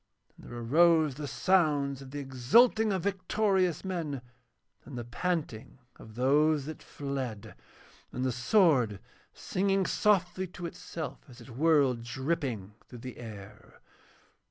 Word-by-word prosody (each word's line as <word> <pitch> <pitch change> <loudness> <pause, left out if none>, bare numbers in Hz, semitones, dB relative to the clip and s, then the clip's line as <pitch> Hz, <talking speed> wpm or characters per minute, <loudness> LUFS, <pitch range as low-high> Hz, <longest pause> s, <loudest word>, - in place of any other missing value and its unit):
And - - -15
there 120 - -8
arose 155 +5 +4
the 145 +2 -6
sounds 145 -6 +1
of 135 - -10
the 145 - -7
exulting 150 - +3
of 190 -3 -1
victorious 190 -2 0
men, 160 -8 -3 0.6
and 135 - -9
the 120 - -4
panting 135 -2 -3 0.2
of 110 -1 -13
those 145 +3 +3
that 155 0 -7
fled, 135 -7 -5 0.6
and 125 - -3
the 130 - +1
sword 125 - +3 0.3
singing 195 0 0
softly 185 -3 +1
to 180 0 -8
itself 165 -1 -6
as 125 0 -14
it 125 +2 -12
whirled 140 -2 +3
dripping 125 - -3
through 125 - -11
the 125 - -7
air. 105 -3 -11
145 Hz, 130 wpm, -30 LUFS, 125-180 Hz, 0.6 s, arose